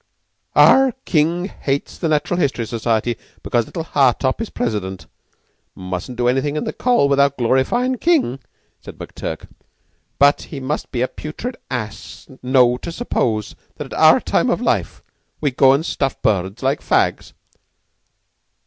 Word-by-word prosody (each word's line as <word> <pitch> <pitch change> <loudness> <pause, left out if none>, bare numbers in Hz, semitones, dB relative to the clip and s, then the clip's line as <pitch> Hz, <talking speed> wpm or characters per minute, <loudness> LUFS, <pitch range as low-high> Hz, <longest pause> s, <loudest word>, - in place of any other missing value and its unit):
"Ah, 265 -2 +6
King 170 +2 +1
hates 140 -7 -4
the 165 - -1
Natural 155 +3 0
History 130 -7 0
Society 115 +1 -1 0.3
because 120 -2 0
little 165 - -5
Hartopp 135 - +1
is 225 - -4
president. 100 -6 -3 0.7
Mustn't 95 +6 -6
do 120 0 +1
anything 135 +4 0
in 150 - -1
the - - -4
Coll. 245 - +2
without 140 0 +2
glorifyin' 135 - +1
King," 300 - +1 0.4
said - - -11
McTurk. - - -7 0.7
"But 140 +1 +4
he 140 - -6
must 135 +3 -4
be 125 -2 0
a - - +1
putrid 225 - -7
ass, 110 -6 -6
know, 125 -1 +3
to 170 - -7
suppose 115 - -2 0.2
at - - -7
our - - +6
time - - 0
o' - - +3
life - - -2 0.4
we'd 145 -4 -1
go 130 0 +6
and 140 +4 +1
stuff 135 -6 -2
birds 100 +2 0
like 135 +2 +1
fags." - - 0
135 Hz, 145 wpm, -19 LUFS, 120-155 Hz, 0.7 s, Ah